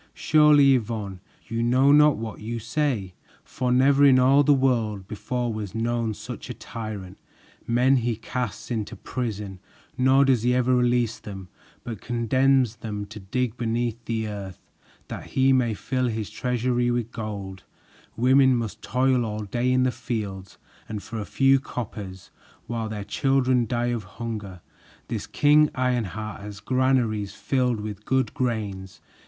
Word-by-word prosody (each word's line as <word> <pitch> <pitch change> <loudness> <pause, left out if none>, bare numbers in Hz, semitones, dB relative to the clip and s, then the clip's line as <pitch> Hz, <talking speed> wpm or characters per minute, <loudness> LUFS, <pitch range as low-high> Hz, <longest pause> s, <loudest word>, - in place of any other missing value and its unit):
"Surely, 150 -3 +5
Yvonne, 105 -6 -2 0.3
you 115 0 -2
know 130 +4 +4
not 150 0 +6
what 110 -1 -6
you 115 +2 -4
say, 115 -5 -1 0.3
for 125 -1 -2
never 135 +3 +4
in 135 -2 +7
all 135 +3 +5
the 145 - +4
world 115 -8 +1
before 120 +3 -3
was 105 -1 -6
known 115 0 0
such - - -8
a - - -5
tyrant! 105 -5 -7 0.5
Men 125 +3 +3
he 120 -1 0
casts 120 +1 -5
into 110 -3 -3
prison, 105 -6 -5 0.4
nor 130 +2 +5
does 130 -4 +3
he 125 +2 +2
ever 125 0 +3
release 120 -2 +1
them, 95 -3 -9 0.3
but 115 -4 -6
condemns 125 0 +2
them 105 -2 -5
to 105 +1 -10
dig 120 +4 -2
beneath 120 0 -2
the 110 -1 -2
earth 100 -3 -6 0.5
that - - -7
he 135 0 +5
may 120 -4 +2
fill 130 +3 -1
his 110 -3 -3
treasury 125 +1 0
with 120 -1 -1
gold; 100 -4 -6 0.6
women 130 +2 +5
must 115 -3 -4
toil 130 -1 +1
all 110 -1 -3
day 120 +5 0
in 130 0 +3
the 130 - +2
fields 100 -6 -5 0.3
and 105 -2 -5
for 115 -1 -6
a 105 - -4
few 135 +3 +3
coppers; 105 -7 -7 0.3
while 115 -1 -3
their 105 -2 -5
children 130 0 +1
die 120 +1 0
of 115 -3 -3
hunger, 105 -4 -6 0.5
this - - -4
King 150 +1 +4
Ironheart 110 -5 -2
has 100 0 -8
granaries 120 -3 0
filled 125 -3 0
full 105 0 -5
of 105 0 -9
good 130 0 +1
grains. 100 -6 -3
120 Hz, 155 wpm, -25 LUFS, 105-130 Hz, 0.6 s, in